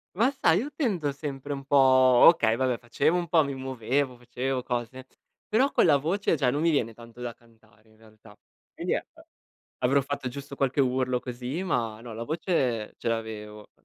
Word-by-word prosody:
Ma 230 Hz, +7 st, +3 dB
sai, 190 Hz, -11 st, +2 dB
io 265 Hz, +7 st, -3 dB
tendo 195 Hz, -, 0 dB
sempre 140 Hz, 0 st, -5 dB
un 135 Hz, -1 st, -7 dB
po' 140 Hz, -, +1 dB, 0.5 s
okay, 115 Hz, -10 st, +5 dB
vabbè 130 Hz, -1 st, 0 dB
facevo 130 Hz, +8 st, 0 dB
un 175 Hz, -1 st, -2 dB
po' 160 Hz, 0 st, +4 dB
mi 140 Hz, -1 st, -4 dB
muovevo, 130 Hz, +1 st, -2 dB
facevo 125 Hz, +2 st, -3 dB
cose. 125 Hz, +1 st, -4 dB, 0.4 s
Però 260 Hz, +6 st, +2 dB
con -, -, +3 dB
la 145 Hz, -3 st, +5 dB
voce 170 Hz, +6 st, 0 dB
già 135 Hz, -5 st, +1 dB
non 145 Hz, +3 st, -1 dB
mi 165 Hz, -, +3 dB
viene 120 Hz, -7 st, 0 dB
tanto 115 Hz, +1 st, -15 dB
da 120 Hz, -1 st, -5 dB
cantare 110 Hz, -2 st, -26 dB
in 110 Hz, -, -24 dB
realtà. 110 Hz, -1 st, -18 dB, 0.4 s
E -, -, -8 dB
niente, -, -, -4 dB, 0.5 s
avrò 135 Hz, +3 st, +2 dB
fatto 140 Hz, -1 st, -4 dB
giusto 140 Hz, +2 st, -8 dB
qualche 135 Hz, 0 st, +1 dB
urlo 130 Hz, -1 st, 0 dB
così, 125 Hz, +6 st, -5 dB
ma 115 Hz, -, -1 dB
no, 120 Hz, -1 st, -8 dB
la 115 Hz, +1 st, -5 dB
voce 130 Hz, -, -1 dB
ce -, -, -3 dB
l'avevo. 105 Hz, -2 st, -5 dB
130 Hz, 185 wpm, -27 LUFS, 115-145 Hz, 0.5 s, okay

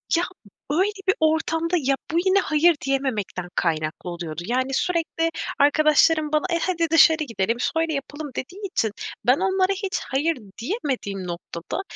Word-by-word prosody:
Ya, 340 Hz, -, +2 dB, 0.5 s
böyle 375 Hz, +7 st, +2 dB, 0.2 s
bir 380 Hz, -, +4 dB
ortamda, 320 Hz, +2 st, +1 dB
ya, 275 Hz, -2 st, +1 dB, 0.2 s
bu 330 Hz, -, 0 dB
yine, 380 Hz, +1 st, +4 dB
hayır, 330 Hz, -1 st, +3 dB
diyememekten 250 Hz, -10 st, -2 dB
kaynaklı 160 Hz, +1 st, -1 dB
oluyordu. 170 Hz, -2 st, -5 dB
Yani, 255 Hz, +4 st, -1 dB
sürekli 330 Hz, +1 st, 0 dB, 0.3 s
arkadaşlarım 305 Hz, +1 st, +4 dB
bana; 305 Hz, +3 st, +1 dB
"E, 335 Hz, -, +2 dB
hadi 335 Hz, -2 st, 0 dB
dışarı 320 Hz, -1 st, +6 dB
gidelim, 230 Hz, -3 st, -1 dB
söyle 325 Hz, +4 st, 0 dB
yapalım." 290 Hz, +2 st, -5 dB
dediği 365 Hz, +10 st, -6 dB
için, 220 Hz, -, 0 dB, 0.3 s
ben 250 Hz, +3 st, +5 dB
onlara 380 Hz, +1 st, +2 dB
hiç 390 Hz, -1 st, -3 dB
hayır 295 Hz, +4 st, +1 dB, 0.2 s
diyemediğim 235 Hz, -, -3 dB
noktada, 170 Hz, -, -5 dB
305 Hz, 145 wpm, -23 LUFS, 240-335 Hz, 0.5 s, dışarı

